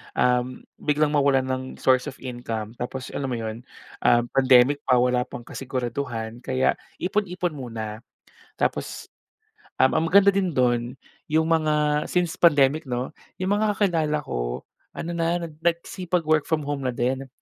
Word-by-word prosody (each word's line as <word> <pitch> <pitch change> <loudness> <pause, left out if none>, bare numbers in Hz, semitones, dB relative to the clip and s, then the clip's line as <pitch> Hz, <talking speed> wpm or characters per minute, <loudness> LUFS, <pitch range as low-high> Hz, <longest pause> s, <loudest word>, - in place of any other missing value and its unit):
um, 125 0 +1 0.2
biglang 150 0 +1
mawalan 140 -3 +3
ng 130 0 -2
source 130 +2 +2
of 135 - -6
income 115 -4 -4
tapos 130 +1 -5
alam 135 - -3
mo 125 - -2
'yon, 115 +2 -5 0.3
um, 120 0 +4
pandemic 130 +1 +5
pa, 125 - +5
wala 125 0 +2
pang 120 - -8
kasiguraduhan 120 -3 -4
kaya 130 +1 +1 0.2
ipon-ipon 180 -2 -1
muna. 115 -6 -6 0.6
Tapos, - - -2 0.6
um, 130 - +4
ang 165 - +1
maganda 200 +2 +6
din 190 -5 0
do'n 120 0 +1 0.3
yung 160 +2 +1
mga 150 -2 +2
since 175 -2 -1
pandemic 145 -2 +4
'no, 125 +1 -2 0.2
yung 185 +2 -2
mga 210 -1 +1
kakilala 160 -7 +1
ko - - -3 0.3
ano 170 - -4
na, 170 0 0
nag 155 -2 -9
nagsipag-work 170 -2 0
from 155 -2 0
home 145 0 -2
na 125 - -2
din. 130 +3 -1
135 Hz, 150 wpm, -24 LUFS, 125-160 Hz, 0.6 s, maganda